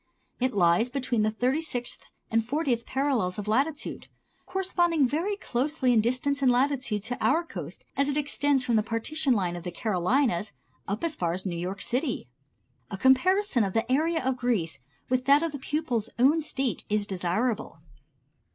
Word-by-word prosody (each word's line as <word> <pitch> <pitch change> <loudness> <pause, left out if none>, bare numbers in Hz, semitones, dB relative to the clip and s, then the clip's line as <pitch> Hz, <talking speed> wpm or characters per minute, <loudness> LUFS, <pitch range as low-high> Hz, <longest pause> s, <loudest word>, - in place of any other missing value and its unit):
It 255 -1 0
lies 175 +5 +3
between 250 -4 0
the 215 - +2
thirty 250 +7 0
sixth 245 -7 -3 0.3
and 225 0 +2
fortieth 250 -2 -1
parallels 260 -10 0
of 210 0 -5
latitude, 280 +7 -1 0.4
corresponding 345 -6 +2
very 335 +10 -1
closely 260 -4 0
in 225 - +5
distance 255 +5 0
and 260 -2 +5
latitude 250 -5 +1
to 245 +3 -4
our 335 +2 +3
coast 335 - -8
as 280 +1 +1
it 285 - 0
extends 290 -2 +1
from 235 -2 +2
the - - +4
partition 240 +6 0
line 180 -5 0
of 175 - -6
the 180 - -4
Carolinas 205 - 0 0.3
up 200 +7 -3
as 330 -2 -1
far 170 -2 -1
as 185 +3 -4
New 180 -3 -2
York 185 +4 -3
City. 250 - -1 0.6
A 195 - -5
comparison 265 - +3
of 195 -2 -2
the 225 +2 0
area 320 +1 +1
of 260 -1 0
Greece 200 - -1 0.3
with 255 0 0
that 285 +3 +5
of 330 - -1
the 285 - -6
pupil's 260 -6 -2
own 280 +7 +4
State 270 -5 -2
is 210 0 +1
desirable. 200 +2 -1
250 Hz, 175 wpm, -27 LUFS, 215-285 Hz, 0.6 s, in